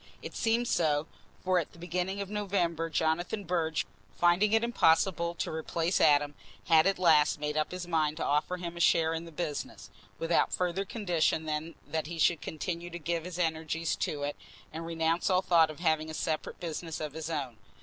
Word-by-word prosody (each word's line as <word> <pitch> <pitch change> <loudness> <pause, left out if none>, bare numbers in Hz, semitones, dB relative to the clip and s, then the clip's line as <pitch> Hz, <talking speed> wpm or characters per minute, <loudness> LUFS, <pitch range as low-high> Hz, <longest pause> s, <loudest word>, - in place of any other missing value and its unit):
It - - -7
seemed 230 +1 +1
so, 155 -5 +1 0.4
for 185 -1 +3
at 165 - -5
the - - -16
beginning 180 +3 -2
of 200 - -5
November, 175 -6 -1
Jonathan 165 +6 0
Burge, 165 -3 0 0.3
finding 175 +4 +4
it 225 +1 +3
impossible 170 -5 +2
to - - -3
replace 165 +2 -1
Adam, 145 0 +4 0.3
had 160 +1 +5
at 195 - +2
last 160 -5 +4
made 150 0 -2
up 155 0 +1
his 180 -1 -5
mind 155 -3 +1
to - - -2
offer 150 +5 0
him 175 -1 -6
a - - -7
share 160 0 +4
in 165 +1 -4
the 165 - -10
business, 155 -2 -5 0.3
without 165 +1 +1
further 180 +2 -1
condition 175 -7 0
than 155 +1 -3
that 155 +1 -3
he 170 +1 -6
should 165 0 +3
continue 170 +2 -4
to 175 - -6
give 170 0 -2
his 180 -1 -6
energies 160 -1 -1
to 145 -1 -2
it 145 +1 -2 0.4
and 165 +1 -5
renounce 165 +2 0
all 185 0 +3
thought 165 -3 +5
of 155 - -9
having 155 -2 +1
a 160 - -5
separate 155 -1 -3
business 165 -1 -5
of 150 -2 -4
his 160 +1 -5
own. 135 -8 -3
165 Hz, 195 wpm, -30 LUFS, 155-180 Hz, 0.4 s, had